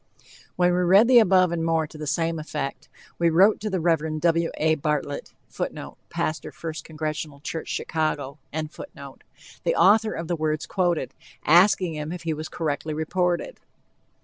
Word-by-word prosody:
When 180 0 +3
we 180 - +1
read 190 +5 +5
the 250 -1 +8
above 185 -4 +4
and 170 -1 -1
more 165 -1 +1
to 150 - -15
the 150 -1 -6
same 165 +2 0
effect, 150 -3 -5 0.3
we 170 -1 +4
wrote 190 +6 +5
to 215 - -3
the 190 -2 -1
Rev. 160 -2 0
W. 165 0 +2
A. 155 +1 +3
Bartlett, 150 -1 -2 0.2
[Footnote: - - -6
Pastor 155 0 -3
First 160 -1 -7
Congregational 155 -2 -5
Church, 160 +3 -5
Chicago.] 150 -3 -2
the 155 - -6
author 215 +1 +4
of 165 - -5
the 175 - 0
words 155 -1 -1
quoted, 175 -7 -1 0.3
asking 180 +1 +5
him 150 0 -5
if 175 -1 -6
he 165 -1 -1
was 155 +1 -6
correctly 155 -1 -3
reported. 180 - -1
160 Hz, 160 wpm, -25 LUFS, 155-180 Hz, 0.3 s, the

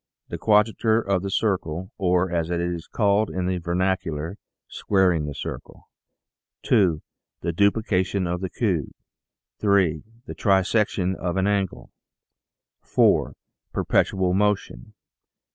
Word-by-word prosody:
The - - -5
Quadrature 110 +1 +3
of 100 -4 0
the 100 - -4
Circle 95 -4 -1
or, 90 -1 +1
as 85 -1 -1
it 85 -1 -1
is 85 -1 -3
called 105 0 +1
in 90 -1 -3
the 90 0 -1
vernacular, 85 -1 -2 0.2
" - - -66
Squaring 90 -6 +2
the 75 - -6
Circle." - - -8 0.8
2. 90 -7 +2 0.4
The 85 - -1
Duplication 100 -1 +1
of 90 +1 -2
the 95 - -3
Cube. 90 - -1 0.7
3. 95 -7 +2 0.2
The - - -7
Trisection 95 -1 +1
of 90 0 -3
an 95 - +1
Angle. 100 -2 -1 0.9
4. - - +2 0.4
Perpetual 95 -2 +1
Motion. 100 -11 -1
95 Hz, 125 wpm, -24 LUFS, 85-100 Hz, 0.9 s, Quadrature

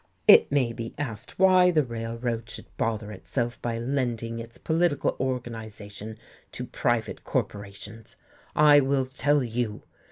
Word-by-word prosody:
It - - +8
may 130 -5 +2
be 115 0 -6
asked 115 -8 -5
why 185 -1 +6
the 160 -4 +3
Railroad 115 -1 -4
should - - -7
bother 110 -2 -2
itself 120 +4 -3
by 115 -1 -2
lending 120 -2 -2
its 115 0 -9
political 160 -3 +1
organization 110 -4 -5 0.4
to - - -4
private - - -1
corporations? 100 +2 -4 0.4
I 150 -1 +7
will 135 -1 +1
tell 145 +2 +2
you. 115 -2 -3
115 Hz, 130 wpm, -26 LUFS, 115-140 Hz, 0.4 s, It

